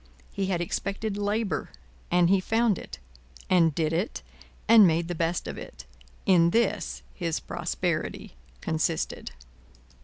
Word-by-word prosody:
He 195 -2 -2
had 180 -3 0
expected 200 +4 -2
labour, 205 0 -1 0.4
and 175 0 +4
he 195 +2 +4
found 225 +1 +1
it, - - -9 0.5
and 165 -5 +4
did 160 -1 0
it 180 +8 -2 0.4
and 220 -3 +8
made 165 0 +1
the - - -1
best 165 +1 -1
of - - -5
it. - - -10 0.4
In 175 -4 +5
this, 210 -2 0
his 165 -3 -2
prosperity 170 - -3 0.3
consisted. 160 +1 -1
180 Hz, 130 wpm, -27 LUFS, 170-205 Hz, 0.5 s, and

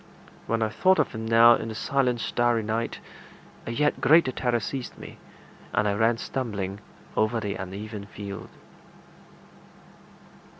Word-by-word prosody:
When 115 +1 +1
I 110 - 0
thought 185 - +3
of - - +2
him 110 0 -5
now 115 +1 +7
in 115 - -2
the 110 - -6
silent 125 -2 0
starry 120 -1 +1
night, 115 +2 -2 0.7
a - - -2
yet 150 +5 0
greater 155 +1 +5
terror 120 -1 0
seized 125 +3 -5
me, - - -11 0.5
and 105 - +2
I 100 - +1
ran 115 +3 +2
stumbling 105 -7 -4 0.4
over 110 +2 +1
the 100 -2 -3
uneven 100 +2 -7
field. 100 -1 -8
115 Hz, 140 wpm, -26 LUFS, 105-120 Hz, 0.7 s, now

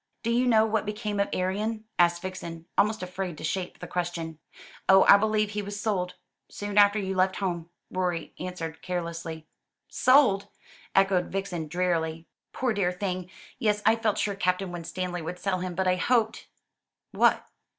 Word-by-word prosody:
"Do 230 - 0
you 245 +2 +2
know 220 -2 +5
what 220 -1 0
became 210 -1 -3
of 200 - +1
Arion?" 210 +4 -1 0.2
asked 175 0 +4
Vixen, 170 -3 -6
almost 210 0 +2
afraid 180 -2 -4
to - - -9
shape 180 +3 -3
the - - -8
question. 170 -3 -3 0.5
"Oh, 190 0 +8
I - - +10
believe 215 0 +1
he 210 0 -2
was 205 0 -6
sold, 190 -4 -1 0.3
soon 205 0 -5
after 205 +1 +6
you 190 -2 -2
left 185 0 +2
home," 175 -4 -3 0.2
Rorie 180 -3 -2
answered 175 -3 -5
carelessly. 170 -3 -4 0.4
"Sold!" 255 -7 +4 0.5
echoed 195 -2 +3
Vixen 185 -5 -3
drearily. 165 -1 -1 0.3
"Poor 250 -3 0
dear 195 -4 +1
thing! 180 -1 -3 0.3
Yes, 210 -4 +1
I 220 +1 +6
felt 225 -2 0
sure 205 - 0
Captain 185 -1 0
Winstanley 175 +1 -4
would 170 +3 -5
sell 185 0 -1
him. 180 -1 -4
But 190 +1 0
I 185 0 +3
hoped 225 +2 +1 0.3
" - - -61
"What?" - - +3
185 Hz, 170 wpm, -27 LUFS, 175-205 Hz, 0.5 s, I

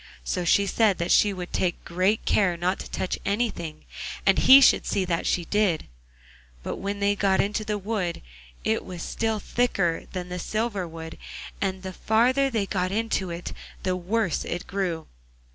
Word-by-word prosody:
So 175 - -2
she 200 +4 +4
said 205 -1 +2
that 170 0 -1
she 205 - +5
would 180 -2 -6
take 175 -2 -1
great 185 +5 +1
care 180 -4 +2
not 180 +3 0
to - - -7
touch 185 - -2
anything, 200 -7 -2 0.4
and 195 -1 +4
he 270 +1 +9
should 275 - +5
see 190 - 0
that 170 -2 -1
she 175 - +1
did. 200 -4 +1 0.8
But - - -4
when 200 +1 -3
they 200 0 +3
got 195 -1 +2
into 210 +2 0
the 210 -1 -2
wood 195 -4 -3 0.4
it - - 0
was 175 -2 -7
still 225 -1 -1
thicker 195 -9 0
than 180 -1 -5
the 180 0 -4
silver 215 -1 -2
wood, 160 0 -9 0.4
and 190 -1 -2
the 190 0 -5
farther 255 +7 +2
they 220 -5 0
got 185 -2 -1
into 210 -3 -1
it 170 +1 -5 0.3
the 185 -1 0
worse 185 +1 0
it 175 - -4
grew. 180 -4 -2
190 Hz, 180 wpm, -26 LUFS, 175-210 Hz, 0.8 s, he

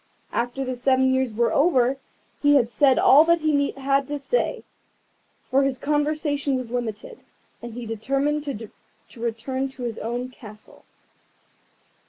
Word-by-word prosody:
After 245 +3 -2
the 255 0 -3
seven 260 +1 +2
years 260 -2 0
were 230 +2 0
over 270 -4 +3 0.4
he 290 0 +5
had 240 -4 +3
said 265 +4 +4
all 290 +3 +7
that 335 0 +3
he 290 -2 +2
had 275 0 0
to 290 - -3
say, 390 - -1 0.9
for 270 +1 +4
his 275 -1 0
conversation 295 0 0
was 255 -3 -4
limited, 245 - -5 0.4
and 235 -1 -8
he 245 -1 -6
determined 275 +7 -1
to 225 -6 -6 0.5
return 240 +4 -2
to 265 -1 -10
his 235 -2 -4
own 240 +3 -4
castle. 215 -4 -15
265 Hz, 145 wpm, -24 LUFS, 240-285 Hz, 0.9 s, all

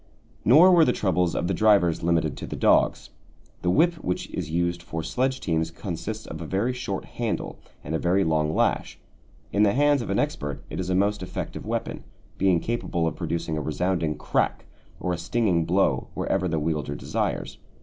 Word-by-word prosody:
Nor 160 +10 +7
were 175 -2 +7
the 125 - +4
troubles 90 -3 +1
of - - -1
the 95 - 0
drivers 100 -4 +3
limited 85 0 +1
to - - -6
the - - -5
dogs. - - +2 0.5
The 90 - 0
whip 165 - +2
which 90 - -3
is 85 -4 -4
used 85 +1 0
for 80 -1 -5
sledge 130 +6 -1
teams 80 -2 -1
consists 100 +5 -5
of 80 - -7
a 80 - -5
very 105 +9 0
short 125 - -4
handle - - -4 0.2
and 80 - -5
a 80 - 0
very 90 +3 +2
long 80 -2 +1
lash. - - 0 0.6
In 100 - +2
the 100 -1 +4
hands 145 0 +3
of 115 - -6
an - - 0
expert 70 -1 -2
it - - -4
is 90 0 -3
a 90 - +1
most 100 +2 +1
effective 90 - -6
weapon, - - -3 0.4
being 95 -3 +3
capable 95 -6 -2
of 80 - -1
producing 80 -2 -2
a - - -3
resounding 80 0 -1
crack - - -1 0.3
or 90 - -1
a 85 - -4
stinging 90 -3 +1
blow 90 +4 +1
wherever 95 -1 0
the 80 -2 -1
wielder 75 -2 -2
desires. - - -3
90 Hz, 190 wpm, -25 LUFS, 80-105 Hz, 0.6 s, Nor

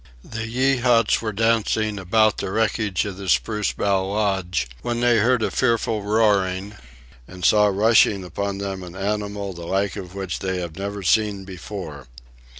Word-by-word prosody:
The 115 0 -6
Yeehats 125 -1 +2
were 110 -2 -2
dancing 110 -1 +1
about 110 +3 +2
the - - -3
wreckage 105 -2 0
of 100 -2 -6
the 100 -2 -6
spruce 105 -2 +1
bough 100 -2 0
lodge 95 - -1
when 120 -1 -2
they 120 -1 +3
heard 120 +1 +2
a - - 0
fearful 115 -3 +1
roaring 100 -2 +1 0.5
and 90 -1 -6
saw 105 -1 +5
rushing 105 -1 +3
upon 100 +3 -4
them 100 -1 -4
an 90 -1 -9
animal 100 0 -3
the 85 -1 -9
like 95 +1 0
of 95 -2 -8
which 95 -3 -4
they 95 -1 -2
had 85 -3 -6
never 100 +1 -5
seen 100 +1 +1
before. 90 -7 -8
100 Hz, 160 wpm, -22 LUFS, 95-110 Hz, 0.5 s, saw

